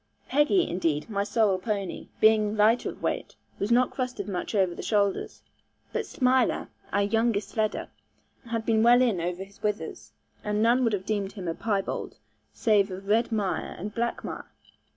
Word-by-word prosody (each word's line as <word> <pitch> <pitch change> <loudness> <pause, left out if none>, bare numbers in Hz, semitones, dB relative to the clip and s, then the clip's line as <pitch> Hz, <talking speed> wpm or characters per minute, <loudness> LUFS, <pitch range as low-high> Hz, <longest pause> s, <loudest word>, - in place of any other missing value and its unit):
Peggy, 295 +6 +3
indeed, 165 +1 -1
my 200 -1 0
sorrel 205 -2 +2
pony, 200 -2 -3
being 215 -1 +4
lighter 220 +3 +4
of - - -10
weight, - - -2 0.2
was 205 +4 -1
not 250 +1 +4
crusted 250 -3 -3
much 195 +2 -3
over 190 -3 +2
the - - -7
shoulders; 200 -2 0 0.5
but - - -2
Smiler 255 -1 +1 0.2
(our 200 +1 +2
youngest 225 0 +1
sledder) 215 -1 0 0.6
had 230 -1 -2
been 220 -1 +3
well 240 +2 +6
in 215 -9 +1
over 175 +2 -3
his 200 +1 -17
withers, 210 0 -3 0.3
and 210 0 -1
none 240 +3 +4
would 230 -3 +2
have 190 -2 -2
deemed 200 -2 -2
him 190 -5 -6
a 165 - 0
piebald, 200 +1 -2 0.3
save 210 -4 +2
of 190 +1 -8
red 230 +3 +3
mire 205 -4 -1
and 205 +4 -6
black 235 0 -2
mire. - - -6
210 Hz, 170 wpm, -27 LUFS, 195-230 Hz, 0.6 s, well